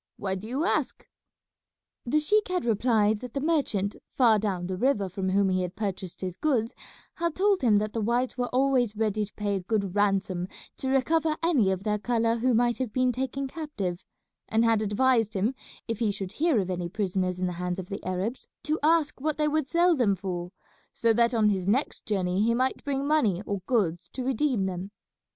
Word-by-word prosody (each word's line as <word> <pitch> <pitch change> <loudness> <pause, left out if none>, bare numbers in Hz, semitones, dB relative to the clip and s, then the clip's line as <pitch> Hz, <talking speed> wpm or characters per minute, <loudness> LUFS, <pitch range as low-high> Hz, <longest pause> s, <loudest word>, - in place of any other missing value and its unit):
Why 190 -2 -2
do 190 +3 -5
you 270 +8 -1
ask?" - - -1 1.0
The 300 +6 +3
sheik 420 +8 +2
had 365 -4 -1
replied 220 -2 +2
that 250 +1 -9
the - - +1
merchant 270 - 0 0.2
far 230 -5 +5
down 190 -4 -2
the 185 +1 -3
river 205 -2 +1
from 190 +1 -3
whom 195 +1 +3
he 185 0 +1
had 180 -1 -4
purchased 190 -4 -4
his 185 -2 -4
goods 240 -6 0 0.4
had 335 -2 -1
told 395 0 +2
him 230 -5 +4
that 215 +1 -1
the 225 - -1
whites 240 +4 0
were 250 -1 -1
always 255 -4 +2
ready 215 -1 0
to 205 - -18
pay 205 -1 -1
a - - -2
good 200 0 -1
ransom 195 -3 +1 0.3
to 265 - -3
recover 310 +4 +2
any 280 - +3
of 190 0 -1
their 210 -1 0
colour 230 0 +1
who 245 +1 +2
might 240 +1 +2
have 255 -4 -2
been 255 +2 +2
taken 265 +2 -3
captive, 240 - -4 0.5
and 225 +1 +3
had 225 -2 +3
advised 220 +1 +2
him 205 +7 +1 0.3
if 230 -3 -3
he 225 -3 +1
should 195 -2 -4
hear 315 -6 +2
of 185 -1 -2
any 175 -1 -3
prisoners 185 -2 -1
in 185 - -1
the 180 - -2
hands 180 0 -2
of 190 - -5
the 200 - -5
Arabs 185 +7 -3 0.2
to 310 +1 0
ask 305 -2 +2
what 305 +1 -1
they 300 -1 +2
would 300 -2 0
sell 345 +2 +3
them 225 -8 +2
for, 180 -2 -5 0.4
so 230 -1 +3
that 235 +1 +3
on 220 -3 +3
his 190 -3 -1
next 250 +8 0
journey 190 -2 0
he 230 +2 +3
might 255 +2 0
bring 275 -1 -1
money 230 - +2
or 200 -1 -2
goods 185 -9 0
to 260 - -5
redeem 260 -5 +1
them. 185 +1 -4
225 Hz, 210 wpm, -27 LUFS, 195-265 Hz, 1.0 s, far